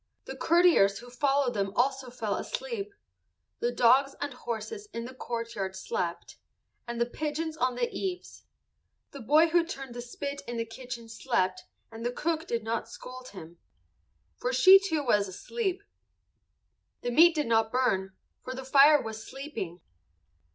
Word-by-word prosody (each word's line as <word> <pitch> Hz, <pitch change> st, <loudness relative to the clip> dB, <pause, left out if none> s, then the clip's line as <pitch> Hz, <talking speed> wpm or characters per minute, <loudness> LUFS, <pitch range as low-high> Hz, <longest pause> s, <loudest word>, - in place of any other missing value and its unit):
The -, -, -7 dB
courtiers 335 Hz, -, +4 dB
who 245 Hz, +2 st, -11 dB
followed 270 Hz, 0 st, +1 dB
them 200 Hz, -2 st, -1 dB
also 265 Hz, 0 st, +1 dB
fell 225 Hz, -4 st, -3 dB
asleep. 470 Hz, -, -4 dB, 0.7 s
The 475 Hz, +1 st, 0 dB
dogs 270 Hz, -, +4 dB
and 285 Hz, -1 st, -3 dB
horses 250 Hz, -, -5 dB
in 230 Hz, 0 st, -4 dB
the 255 Hz, -, -8 dB
courtyard 230 Hz, -6 st, -4 dB
slept, 465 Hz, -, -4 dB, 0.5 s
and 235 Hz, 0 st, -4 dB
the 235 Hz, -, +3 dB
pigeons 310 Hz, +5 st, -3 dB
on 255 Hz, -5 st, 0 dB
the 245 Hz, -1 st, 0 dB
eaves. 365 Hz, -2 st, -5 dB, 0.7 s
The 280 Hz, -, -9 dB
boy 305 Hz, +8 st, +5 dB
who 340 Hz, +1 st, +4 dB
turned 270 Hz, -6 st, -7 dB
the 240 Hz, -, -6 dB
spit 280 Hz, +4 st, -5 dB
in 240 Hz, 0 st, -4 dB
the 230 Hz, -, -1 dB
kitchen 235 Hz, 0 st, -8 dB
slept 220 Hz, -5 st, -1 dB, 0.3 s
and 225 Hz, 0 st, -8 dB
the 240 Hz, -, 0 dB
cook 325 Hz, +5 st, -2 dB
did 230 Hz, -2 st, -2 dB
not 225 Hz, 0 st, -2 dB
scold 255 Hz, +2 st, -10 dB
him, 170 Hz, -5 st, -11 dB, 0.8 s
for -, -, -1 dB
she 385 Hz, -5 st, +8 dB
too 320 Hz, -7 st, -1 dB
was 205 Hz, -6 st, +2 dB
asleep. 380 Hz, -, -3 dB, 1.2 s
The 245 Hz, -, -2 dB
meat 330 Hz, +6 st, +6 dB
did 300 Hz, -, 0 dB
not 225 Hz, -1 st, +2 dB
burn, 195 Hz, -7 st, +1 dB, 0.3 s
for 255 Hz, -, -5 dB
the 265 Hz, 0 st, -7 dB
fire 285 Hz, +3 st, +7 dB
was 220 Hz, -2 st, -6 dB
sleeping. 230 Hz, -, -7 dB
255 Hz, 160 wpm, -29 LUFS, 230-310 Hz, 1.2 s, she